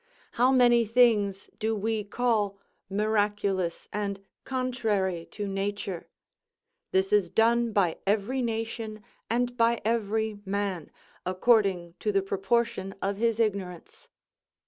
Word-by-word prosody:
How 250 Hz, +2 st, +3 dB
many 240 Hz, -2 st, +5 dB
things 215 Hz, -4 st, +3 dB
do 220 Hz, +1 st, 0 dB
we 215 Hz, +1 st, -1 dB
call 210 Hz, -2 st, 0 dB, 0.3 s
miraculous, 205 Hz, -3 st, 0 dB
and 200 Hz, -1 st, -2 dB, 0.3 s
contrary 220 Hz, -9 st, -1 dB
to 205 Hz, -1 st, -5 dB
nature? 195 Hz, -2 st, -3 dB, 0.8 s
This 190 Hz, +1 st, +1 dB
is 200 Hz, -4 st, +4 dB
done 235 Hz, +2 st, +3 dB
by 190 Hz, -6 st, +1 dB
every 215 Hz, +6 st, +1 dB
nation 225 Hz, -2 st, -3 dB, 0.3 s
and 245 Hz, +1 st, 0 dB
by 235 Hz, -1 st, +3 dB
every 220 Hz, -1 st, 0 dB
man, 195 Hz, -4 st, -2 dB, 0.3 s
according 185 Hz, -3 st, +2 dB
to 210 Hz, -, 0 dB
the 195 Hz, -1 st, +1 dB
proportion 195 Hz, +1 st, -1 dB
of 195 Hz, 0 st, -2 dB
his 230 Hz, 0 st, +1 dB
ignorance. 195 Hz, -6 st, -3 dB
210 Hz, 115 wpm, -28 LUFS, 195-230 Hz, 0.8 s, many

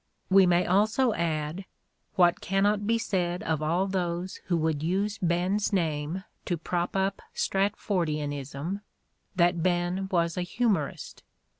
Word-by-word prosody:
We 190 Hz, -1 st, +7 dB
may 175 Hz, 0 st, +3 dB
also 215 Hz, +6 st, +3 dB
add, 165 Hz, +1 st, -2 dB, 0.5 s
what 175 Hz, -2 st, +4 dB
cannot 205 Hz, +2 st, +1 dB
be 230 Hz, +1 st, +3 dB
said 180 Hz, -6 st, -1 dB
of 160 Hz, -2 st, -1 dB
all 170 Hz, +5 st, +1 dB
those 180 Hz, -1 st, -2 dB
who 175 Hz, -, +1 dB
would 160 Hz, -2 st, 0 dB
use 195 Hz, +6 st, -1 dB
Ben's 180 Hz, +4 st, +1 dB
name 165 Hz, -1 st, -1 dB, 0.2 s
to 175 Hz, -, -1 dB
prop 175 Hz, +3 st, -2 dB
up 195 Hz, 0 st, 0 dB
Stratfordianism, 160 Hz, -4 st, -1 dB, 0.5 s
that 175 Hz, -1 st, +3 dB
Ben 180 Hz, +2 st, 0 dB
was 170 Hz, -1 st, +1 dB
a -, -, 0 dB
humorist. 185 Hz, -, -1 dB
180 Hz, 130 wpm, -28 LUFS, 165-195 Hz, 0.5 s, We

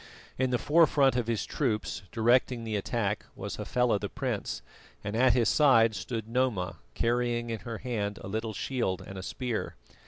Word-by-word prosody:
In 130 Hz, 0 st, +2 dB
the 125 Hz, -, +2 dB
forefront 145 Hz, -2 st, +4 dB
of 120 Hz, -2 st, 0 dB
his 115 Hz, -3 st, 0 dB
troops, 110 Hz, -10 st, -1 dB
directing 120 Hz, +1 st, +2 dB
the 110 Hz, -1 st, -3 dB
attack, 105 Hz, 0 st, -1 dB
was -, -, -5 dB
Hafela 125 Hz, -4 st, +1 dB
the 100 Hz, -, -4 dB
prince, 130 Hz, -7 st, -3 dB, 0.4 s
and 105 Hz, +1 st, -3 dB
at 125 Hz, +1 st, +5 dB
his 120 Hz, -2 st, +3 dB
side 115 Hz, -7 st, +5 dB
stood 110 Hz, +1 st, -4 dB
Noma, 115 Hz, -6 st, 0 dB, 0.2 s
carrying 120 Hz, 0 st, 0 dB
in 115 Hz, -, -3 dB
her 115 Hz, +3 st, -6 dB
hand 105 Hz, -5 st, -3 dB
a -, -, -6 dB
little 110 Hz, +2 st, -3 dB
shield 110 Hz, -5 st, -2 dB
and 95 Hz, -, -9 dB
a 95 Hz, -, -5 dB
spear. 120 Hz, +4 st, -3 dB
115 Hz, 175 wpm, -29 LUFS, 105-125 Hz, 0.4 s, at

